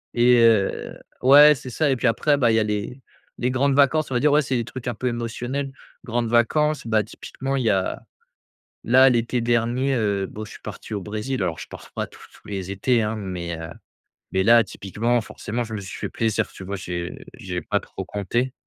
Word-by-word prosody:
Et 120 0 +5
heu, 115 -4 +2 0.2
ouais 145 +3 +8
c'est 130 - -9
ça 150 +5 0
et 135 - +3
puis 125 - 0
après, 145 +6 +2
bah, 120 -4 +3
il 110 - +3
y - - +4
a - - +2
les 105 +5 -3 0.4
les 125 +1 0
grandes 135 +2 +2
vacances, 145 +1 +3
on - - -1
va - - +3
dire. 150 +3 +3
Ouais 150 - +5
c'est 130 -2 -2
des 120 - -1
trucs 120 +1 -8
un 120 - -2
peu 125 - -3
émotionnels, 120 +3 -3 0.3
grandes 120 0 -1
vacances, 150 +6 +2
bah, 110 -1 +2
typiquement 135 +5 -5
il 130 - 0
y 115 - +2
a 95 -2 0 0.8
là 130 +3 +6
l'été 120 0 +1
dernier, 120 +3 +1
heu, 100 -5 0
bon 110 +3 -7
je 110 - -11
suis - - -12
parti - - -8
au 100 - -2
Brésil 110 +5 -3
alors 85 -3 -2
je - - -8
pars - - -11
pas - - -3
tous - - -18
tous - - -19
les 95 -2 -4
étés, 115 +5 +1
hein, 110 +1 -2
mais 90 -5 -5
heu, 80 0 -6 0.6
mais 95 0 +1
là 115 +2 +6
typiquement, 110 +5 -1
forcément, 115 +2 -4
je 110 -1 -8
me 110 - -3
suis 95 - -8
fait - - -4
plaisir 110 -2 0
tu - - -10
vois? 100 +2 -4
J'ai 90 -2 -5 0.2
j'ai 90 -2 -5
pas - - 0
trop - - -8
compté 120 +6 -2
115 Hz, 225 wpm, -23 LUFS, 105-130 Hz, 0.8 s, ouais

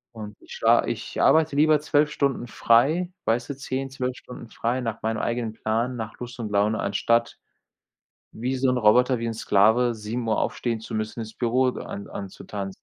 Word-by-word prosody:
Und 105 -1 -8
ich - - -12
schla - - +4
ich - - -4
arbeite 155 -2 +4
lieber 155 0 +4
12 150 0 +2
Stunden 140 -4 -1
frei 135 - +2
weißt 115 +3 0
du, 140 - -5
10, 135 0 -4
12 130 -1 -3
Stunden 125 -1 -11
frei 120 +3 -2
nach 115 -2 -4
meinem 110 0 -1
eigenen 115 -1 -2
Plan, 115 +3 -2
nach 110 -1 -6
Lust 125 0 -7
und 110 -3 -3
Laune, 105 +2 +2
anstatt 115 +3 +1 1.0
wie 125 +4 -3
so 130 0 +1
'n 125 - +2
Roboter, 125 +3 +4
wie 115 - -4
'n 115 - -1
Sklave, 110 +3 +3
7:00 110 +1 -2
aufstehen 115 -2 -1
zu 110 +1 -8
müssen, 110 +2 -3
ins 110 0 -6
Büro 125 +2 +1
an 100 - -7
anzutanzen. 95 0 -7
120 Hz, 185 wpm, -25 LUFS, 110-130 Hz, 1.0 s, schla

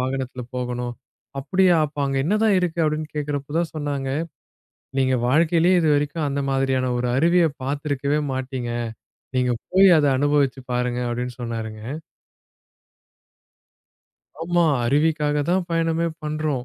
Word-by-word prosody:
வாகனத்துல 130 -1 -3
போகணும். 125 -1 -3 0.5
அப்படியா? 185 +4 +3
அப்ப 145 0 -14
அங்க 135 0 -1
என்னதான் 210 +2 +3
இருக்கு? 175 -1 -2
அப்படின்னு 155 0 -1
கேக்குறப்ப 145 0 -3
தான் 170 -1 -1
சொன்னாங்க. 140 -3 -3 0.9
நீங்க 130 0 +2
வாழ்க்கையிலயே 170 +5 +4
இதுவரைக்கும் 150 0 +1
அந்த 140 0 -1
மாதிரியான 135 -1 +1
ஒரு 125 0 -1
அருவியை 170 +3 +4
பாத்துருக்கவே 145 +1 -1
மாட்டீங்க. 130 -2 -4 0.7
நீங்கப் 125 -2 0
போய் 190 +1 +7
அதை 145 -1 +3
அனுபவிச்சு 145 -2 +1
பாருங்க! 125 0 -1
அப்படின்னு 125 +1 -3
சொன்னாருங்க. 110 -2 -5 2.6
ஆமா. 175 0 +2 0.2
அருவிக்காகத் 150 +1 +1
தான் 185 0 +2
பயணமே 165 0 +1 0.2
பண்றோம். 150 -4 -2
145 Hz, 115 wpm, -23 LUFS, 130-160 Hz, 2.6 s, போய்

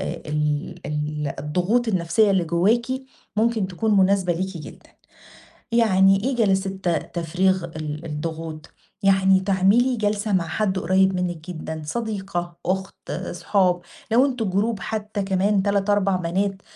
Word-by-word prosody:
ال 150 -2 -2
ال 150 -1 -2
الضغوط 180 +11 0
النفسية 200 +2 +2
اللي 190 -3 +2
جواكِ 190 +9 +2 0.5
ممكن 220 -2 +2
تكون 210 +3 0
مناسبة 190 -1 +3
ليكِ 185 +2 -3
جدًا. 150 - -12 0.8
يعني 195 -3 +4
إيه 265 -1 0
جلسات 195 -4 +1 0.3
تفريغ 180 +2 +1
ال 155 -1 -6
الضغوط؟ 160 0 -5 0.3
يعني 190 -1 +4
تعملي 200 +7 +3
جلسة 210 -1 -1
مع 175 -4 +1
حد 190 +3 0
قريب 190 +1 +3
منِك 175 -2 -3
جدًا، 160 -2 -6
صديقة، 190 -3 -3
أُخت، 190 +1 -3 0.2
صحاب، 180 -3 +1 0.3
لو 255 +4 +5
أنتم 245 -7 -2
جروب 205 +2 0
حتى 215 -1 -3
كمان 195 +1 +1
3، 200 0 +1
4 200 -2 +2
بنات 190 +3 -1
190 Hz, 130 wpm, -23 LUFS, 170-205 Hz, 0.8 s, لو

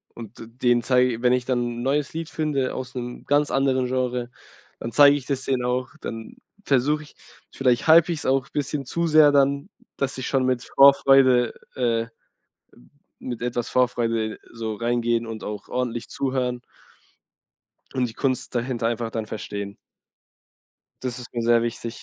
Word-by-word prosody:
Und 115 -1 -10
d 115 - -9
denen 120 0 +1
zeige 125 -2 +2
wenn 125 0 +4
ich 125 -1 0
dann 120 -2 -1
'n - - -4
neues 140 +2 0
Lied 165 0 -5
finde 145 -4 -1
aus 130 -1 -6
'nem 125 -1 -6
ganz 145 +1 +2
anderen 130 -1 +1
Genre, 125 -1 -2 0.5
dann 115 - -5
zeige 145 +1 +7
ich 135 - -9
das 135 -1 -3
denen 130 -2 0
auch. 125 +1 -1
Dann 115 0 -7 0.3
versuche 145 +3 +1
ich 145 - -18 0.4
vielleicht 125 -1 +1
hype 165 +1 +7
ich’s 165 -3 -3
auch 135 -1 +1
bisschen 145 -1 -3
zu 170 +5 -1
sehr 155 -2 +6
dann, 140 +5 +2 0.3
dass 135 -1 -2
ich 130 - -4
schon 135 -2 +1
mit 125 -1 0
Vorfreude, 135 -3 +6 0.2
äh 115 -2 0 1.2
mit 120 -2 -5
etwas 120 0 -2
Vorfreude 115 -3 0
so 110 -2 -4
reingehen 120 0 0
und 110 -1 -7
auch 105 0 -6
ordentlich 120 -2 -3
zuhören 130 -2 -2 1.3
und 125 -2 0
die 110 - -11
Kunst 130 -1 -2
dahinter 120 -1 -1
einfach 115 -1 -3
dann 110 -1 -4
verstehen. 100 -2 -6 1.3
Das 125 -1 -4
ist 125 - -11
mir 120 - -1
sehr 115 0 +4
wichtig. 120 0 -5
125 Hz, 165 wpm, -24 LUFS, 120-135 Hz, 1.3 s, zeige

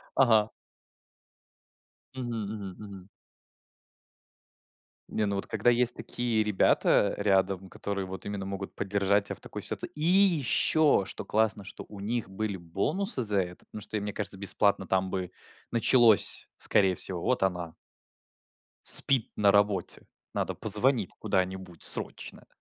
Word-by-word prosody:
Ага. 110 -5 +3 1.7
Мгм 125 -2 -6 0.2
мгм 100 -4 -8
мгм. 100 -3 -12 2.0
Не, 110 - -2
ну 100 -1 -3
вот - - -5
когда 110 +2 0
есть 120 0 +5
такие 115 -3 -2
ребята 105 0 +1
рядом, 95 -2 -1
которые 100 0 -5
вот 95 +1 -9
именно 100 -1 -6
могут 95 0 -7
поддержать 100 0 -1
тебя - - -5
в - - -12
такой - - -9
сит - - -5 0.2
И 150 - -9
ещё, 160 - +3
что - - -7
классно, 110 -1 -1
что 95 - -11
у 100 -2 -12
них 110 -1 -4
были 100 0 -5
бонусы 125 - -1
за 105 -2 +6
это. 90 -1 -6
Ну 105 - -8
что, 105 - -4
мне 105 - -5
кажется, 100 -1 +2
бесплатно 100 0 +1
там 95 +1 -1
бы 95 -2 -5 0.4
началось 115 -2 +3
скорее 95 -2 +1
всего: 90 -1 -4
"Вот 125 - -1
она" 90 -3 -3 1.1
"спит 130 -5 +8
на 100 -1 +3
работе. 100 -3 0 0.3
Надо - - -3
позвонить 110 0 +1
куда-нибудь 95 -4 -4
срочно". - - 0
100 Hz, 135 wpm, -27 LUFS, 95-110 Hz, 2.0 s, спит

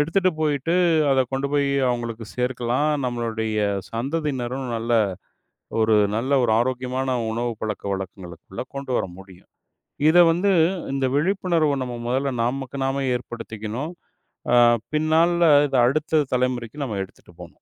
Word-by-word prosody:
எடுத்துட்டு 185 +5 +2
போயிட்டு, 150 +2 0 0.4
அத 135 - +4
கொண்டுபோய் 140 +1 0 0.2
அவங்களுக்கு 120 -2 -3
சேர்க்கலாம். 125 +3 0 0.2
நம்மளுடைய 110 -3 -2 0.3
சந்ததியினரும் 130 0 -3
நல்ல 115 +1 -2 0.9
ஒரு 110 -1 +4 0.2
நல்ல 125 +5 -2
ஒரு 110 - +2
ஆரோக்கியமான 130 +1 -2 0.2
உணவு 120 +1 -2
பழக்க 105 -2 -4
வழக்கங்களுக்குள்ள 95 0 -8
கொண்டுவர 135 -2 -1
முடியும். 95 -1 -15 0.6
இத 175 - +5
வந்து 185 +4 +1 0.4
இந்த 135 -1 -1
விழிப்புணர்வ 170 -2 +1
நம்ம 125 -1 -5
முதல்ல 135 +2 0
நமக்கு 135 +2 -3
நாமே 135 +1 -1
ஏற்படுத்திக்கணும். 120 +4 -6 0.6
அ, - - +6 0.4
பின்னால 165 +2 +3 0.2
இத 135 - -2
அடுத்து 155 +3 +1 0.2
தலைமுறைக்கு 125 +2 -2
நம்ம 105 -5 -4
எடுத்துட்டு 95 - -16
போணும். - - -13
130 Hz, 120 wpm, -23 LUFS, 115-145 Hz, 0.9 s, அ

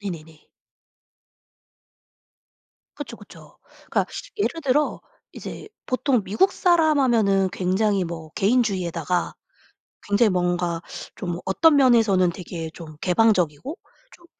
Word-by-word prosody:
네네네. 160 -6 -8 2.5
그쵸, - - -7
그쵸. - - -16 0.3
그러니까 - - +1 0.3
예를 335 -5 -1
들어 290 +2 +1 0.3
이제 - - -9 0.2
보통 255 -3 +1
미국 215 - +2
사람 325 -5 +3
하면은 200 -7 +3
굉장히 195 +1 0
뭐 165 -2 -7
개인주의에다가 185 -6 0 0.7
굉장히 205 +2 +3
뭔가 175 -2 -1 0.4
좀 175 -3 -4
어떤 295 +11 +4
면에서는 225 -9 +4
되게 165 -2 -7
좀 155 -3 -11
개방적이고 185 - +1 0.4
좀 345 - -18
195 Hz, 240 characters per minute, -23 LUFS, 175-250 Hz, 2.5 s, 어떤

